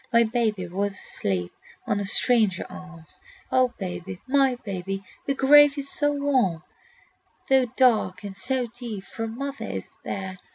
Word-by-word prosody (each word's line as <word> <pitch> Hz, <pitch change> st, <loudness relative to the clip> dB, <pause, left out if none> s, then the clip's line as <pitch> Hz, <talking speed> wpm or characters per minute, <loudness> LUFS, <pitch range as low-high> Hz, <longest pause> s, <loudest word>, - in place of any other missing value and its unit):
My 235 Hz, 0 st, +6 dB
babe 225 Hz, -2 st, 0 dB
was 200 Hz, +2 st, -1 dB
asleep 90 Hz, -, -2 dB, 0.3 s
on 205 Hz, -, 0 dB
a 200 Hz, -, -2 dB
stranger 215 Hz, -2 st, +2 dB
arm. 170 Hz, -3 st, -11 dB, 0.5 s
"O 255 Hz, -1 st, +3 dB
baby, 180 Hz, -1 st, -6 dB
my 270 Hz, -1 st, +3 dB
baby, 195 Hz, -1 st, -4 dB, 0.2 s
the 275 Hz, -, +1 dB
grave 290 Hz, +2 st, +6 dB
is 275 Hz, -1 st, -2 dB
so 290 Hz, 0 st, +2 dB
warm, 260 Hz, -, +1 dB, 0.9 s
"Though 265 Hz, -1 st, +5 dB
dark 220 Hz, -7 st, +3 dB
and 200 Hz, -2 st, -6 dB
so 250 Hz, +6 st, 0 dB
deep, 230 Hz, -4 st, -7 dB
for 225 Hz, +2 st, -5 dB
mother 275 Hz, +5 st, -5 dB
is 95 Hz, -1 st, -7 dB
there! 190 Hz, -1 st, -5 dB
220 Hz, 150 wpm, -25 LUFS, 190-260 Hz, 0.9 s, My